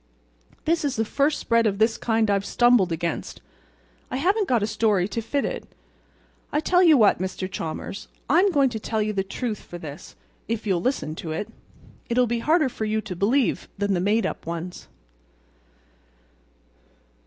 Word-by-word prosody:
This 325 0 +1
is 280 -2 -1
the 225 - 0
first 280 +7 +1
spread 230 -1 +2
of 200 -2 -1
this 220 +2 +3
kind 225 -2 +1
I've 200 -1 +1
stumbled 240 -6 +3
against. 165 0 -3 0.7
I - - -3
haven't 390 +8 +1
got 235 -4 +2
a - - +3
story 210 -4 +1
to 230 - -3
fit 280 +5 -1
it. - - -4 0.8
I'll 300 - +1
tell 360 +3 +3
you 325 -5 +7
what, 215 -4 +4
Mr. 185 0 -3
Chalmers, 185 +2 -5 0.2
I'm 350 +9 +4
going 280 -7 +3
to 220 - -4
tell 215 0 -1
you 215 0 -2
the 195 - 0
truth 215 +2 -4
for 175 - -10
this, 155 0 -9 0.3
if 230 -1 -3
you'll 185 -4 +1
listen 250 - -1
to 160 -2 -4
it. 205 +6 -4 0.6
It'll 250 +1 +3
be 235 0 -1
harder 310 +4 +3
for 225 -3 -4
you 215 0 0
to 190 -4 -6
believe 230 +8 +1
than 200 0 0
the 180 - +1
made 205 +3 +2
up 190 - -5
ones." 170 +2 -5
220 Hz, 175 wpm, -24 LUFS, 195-255 Hz, 0.8 s, you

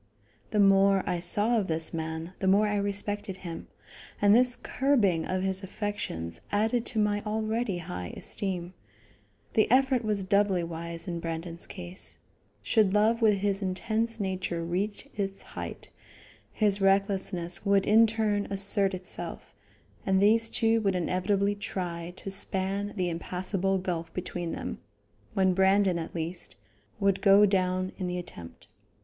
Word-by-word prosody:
The 210 - 0
more 195 -1 +5
I 180 -2 0
saw 210 +7 +3
of 195 - -2
this 160 0 +2
man, 160 +1 -4
the 190 - -1
more 200 +3 +5
I 205 0 0
respected 205 0 -3
him, 165 -1 -6 0.5
and 205 0 +5
this 250 +2 +5
curbing 220 - +1
of 185 0 -1
his 190 0 -1
affections 190 - -5
added 220 +3 +1
to 235 - -5
my 205 -1 +1
already 220 -1 -1
high 90 - -6
esteem. 185 -3 -3 0.8
The 215 - +3
effort 260 0 +3
was 210 -2 -1
doubly 195 -2 +2
wise 170 +1 -5
in 170 -1 -3
Brandon's 165 +1 -5
case. 180 -1 -8 0.5
Should 210 -4 +2
love 225 +3 +3
with 215 -2 +5
his 200 0 0
intense 220 +4 -1
nature 185 -3 -2
reach 195 +5 -3
its 195 -1 -4
height, - - -8 0.6
his 205 -2 +1
recklessness 195 -3 +1
would 200 -1 +3
in 225 +2 +6
turn 215 -2 0
assert 195 0 +3
itself, 180 0 -6 0.5
and 190 -1 +2
these 225 +3 +4
two 225 -1 +2
would 195 -3 +1
inevitably 195 +3 0
try 175 -4 -4
to 195 - -7
span 195 +1 0
the 185 -3 0
impassable 185 +3 -1
gulf 175 -3 -3
between 175 -2 -4
them, - - -5 0.6
when 190 -1 +3
Brandon, 190 -1 +3
at 165 - -7
least, 170 +2 -1 0.4
would 195 -1 +1
go 200 +1 +7
down 185 -1 0
in 185 - -3
the 180 0 -3
attempt. 85 - -10
195 Hz, 145 wpm, -28 LUFS, 180-205 Hz, 0.8 s, go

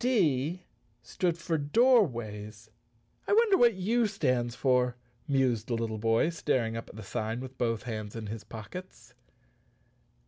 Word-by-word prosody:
"D 175 - +1 0.4
stood 170 +7 -1
for 170 -2 -1
doorways. 120 - +1 0.6
I - - +2
wonder 440 -2 +5
what 240 - +5
U 220 +5 +1
stands 125 - 0
for?" 125 -1 +2 0.3
mused 130 -5 +1
the 120 - -1
little 115 -1 -3
boy, 115 +8 +2
staring 125 -8 0
up 115 - -6
at - - -13
the 110 - -8
sign 110 +2 -3
with 130 0 -9
both 115 -3 0
hands 110 -3 -5
in 115 -1 -5
his 110 +1 -6
pockets. 115 - -10
125 Hz, 145 wpm, -29 LUFS, 115-180 Hz, 0.6 s, wonder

